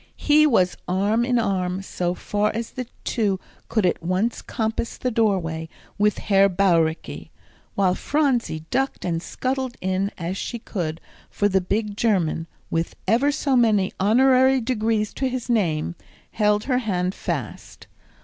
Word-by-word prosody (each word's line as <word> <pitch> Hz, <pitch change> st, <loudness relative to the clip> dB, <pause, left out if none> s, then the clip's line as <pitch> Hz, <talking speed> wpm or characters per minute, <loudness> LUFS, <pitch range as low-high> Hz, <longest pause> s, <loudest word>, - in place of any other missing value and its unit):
He 305 Hz, +1 st, +5 dB
was 185 Hz, -9 st, +2 dB
arm 205 Hz, +5 st, +1 dB
in 245 Hz, 0 st, +1 dB
arm, 190 Hz, -4 st, -1 dB
so 180 Hz, -2 st, -2 dB
far 210 Hz, +2 st, 0 dB
as 230 Hz, 0 st, -3 dB
the 255 Hz, -2 st, -5 dB, 0.2 s
two 205 Hz, -5 st, 0 dB, 0.3 s
could 220 Hz, -4 st, +1 dB
at 180 Hz, -, +1 dB
once 185 Hz, +7 st, -1 dB
compass 225 Hz, 0 st, -3 dB
the 250 Hz, -, -1 dB
doorway, 180 Hz, -8 st, 0 dB, 0.3 s
with 210 Hz, 0 st, +3 dB
Herr 195 Hz, -1 st, +4 dB
Bauricke; 170 Hz, -4 st, +1 dB, 0.5 s
while 190 Hz, -2 st, +3 dB
Phronsie 245 Hz, -, 0 dB
ducked 270 Hz, +2 st, -1 dB
and 165 Hz, -2 st, -1 dB
scuttled 260 Hz, +4 st, -3 dB
in 190 Hz, +1 st, 0 dB
as 180 Hz, +2 st, -3 dB
she 235 Hz, -, -4 dB
could, 165 Hz, -7 st, -4 dB, 0.3 s
for 205 Hz, -, +1 dB
the 190 Hz, -1 st, +2 dB
big 205 Hz, +3 st, -2 dB
German, 180 Hz, -7 st, +1 dB, 0.2 s
with 165 Hz, 0 st, -1 dB
ever 245 Hz, +8 st, +3 dB
so 280 Hz, -2 st, 0 dB
many 215 Hz, -6 st, +3 dB
honorary 260 Hz, +5 st, +4 dB
degrees 225 Hz, -3 st, 0 dB
to 265 Hz, -1 st, -1 dB
his 250 Hz, -1 st, -3 dB
name, 170 Hz, -8 st, +1 dB, 0.4 s
held 210 Hz, -1 st, +2 dB
her 255 Hz, -1 st, +1 dB
hand 185 Hz, -5 st, -1 dB
fast. -, -, -5 dB
210 Hz, 150 wpm, -23 LUFS, 185-240 Hz, 0.5 s, He